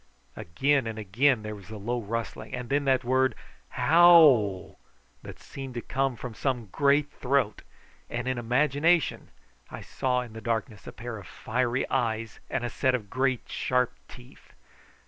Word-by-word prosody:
Again 135 +9 0
and 110 -1 -5
again 110 +4 +1
there 105 0 -5
was 100 -2 -12
the 110 0 -8
low 120 +4 -3
rustling, 115 +4 -5
and 125 -2 -6
then 140 +1 +1
that 130 -1 +2
word 130 +2 +2 0.3
Howl 150 - +5 0.4
that - - -10
seemed 135 -2 -9
to 120 - -3
come 135 +1 -1
from 120 0 -7
some 120 -3 -2
great 145 +1 +2
throat; 130 -6 0 0.5
and 120 +1 -4
in 130 -1 -1
imagination 145 +7 +1 0.4
I - - -8
saw 125 -1 -1
in 120 -3 -9
the 110 - -8
darkness 110 -2 -3
a - - -6
pair 115 0 -7
of 95 - -12
fiery 125 +2 -1
eyes 115 -4 -2
and 135 - -2
a 120 - -2
set 130 +1 +1
of 105 -5 -6
great 130 -1 0
sharp 125 -1 0
teeth. 125 +1 -16
125 Hz, 165 wpm, -27 LUFS, 115-135 Hz, 0.5 s, Howl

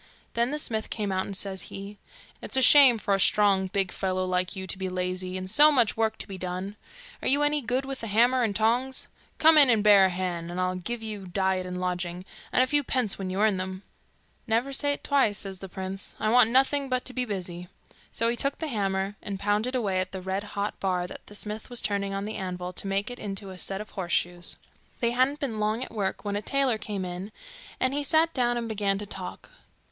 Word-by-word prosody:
Then 235 +1 +1
the 300 - -2
smith 220 -7 -2
came 210 -3 -2
out, 190 0 -1
and 195 - -4
says 190 -2 -1
he, 200 +1 -8 0.4
'It's - - -5
a - - +4
shame 265 -3 +8
for 205 -1 0
a 195 - +2
strong, 195 -1 +4
big 195 -1 -1
fellow 185 -1 -1
like 185 +1 -1
you 190 0 -5
to 190 - -3
be 190 -1 -2
lazy, 185 0 -2
and 185 0 -5
so 295 +10 +6
much 245 -7 +3
work 220 -1 0
to - - -4
be 195 -2 -7
done. 185 +3 -4 0.5
Are - - -2
you 285 +2 +3
any 295 0 +2
good 255 +2 -1
with 270 -1 -6
hammer 235 +4 +3
and 220 -4 0
tongs? 245 +5 +1 0.3
Come 320 0 +7
in 280 -3 +7
and 220 -3 +3
bear 205 -2 +7
a - - +3
hand, 175 -2 -3
an 175 - -6
I'll 185 0 0
give 225 +6 -5
you 210 -3 -6
diet 190 0 0
and 180 0 -4
lodging, 180 0 -3 0.3
and 255 - +4
a - - +3
few 290 +2 +2
pence 245 -7 -1
when 190 -1 -3
you 190 +2 -1
earn 215 -3 +3
them.' 185 +1 -5 0.6
'Never 235 +5 +1
say't 285 +1 0
twice,' 265 -8 +2
says 195 -3 -5
the 195 - -8
prince. 190 +1 -6
'I 215 - +1
want 245 -2 +6
nothing 270 +2 +2
but 255 -1 -1
to 255 - -3
be 255 - 0
busy.' 180 -5 -5 0.4
So 230 - 0
he 235 - +1
took 275 +3 -1
the 320 - -4
hammer, 195 -3 -1
and 200 -2 -5
pounded 210 +6 0
away 200 -7 0
at 185 0 -3
the 190 - -5
red 190 +2 -2
hot 200 +1 -2
bar 180 -2 0
that 180 - -10
the 205 - -11
smith 210 +2 -5
was 245 -1 -3
turning 200 -1 -1
on 195 +1 -3
the 215 - -4
anvil 180 -1 -4
to 195 - -5
make 195 +4 -1
into 200 -4 -5
a 185 - -9
set 195 +1 -3
of 215 - -10
horse 180 -3 -5
shoes. 175 0 0 0.4
They 235 -2 +1
hadn't 260 +4 +2
been 245 -8 -3
long 215 +3 0
at 255 - -9
work 205 -1 -2
when 205 0 -1
a 205 - -1
tailor 265 -1 +1
came 200 -2 -4
in, 180 +3 -6 0.5
and 260 +1 +1
he 290 - 0
sat 320 +3 +3
down 240 -2 +1
and 235 -1 -3
began 200 -3 0
to 205 - -6
talk. 195 - -8
205 Hz, 235 wpm, -27 LUFS, 190-245 Hz, 0.6 s, shame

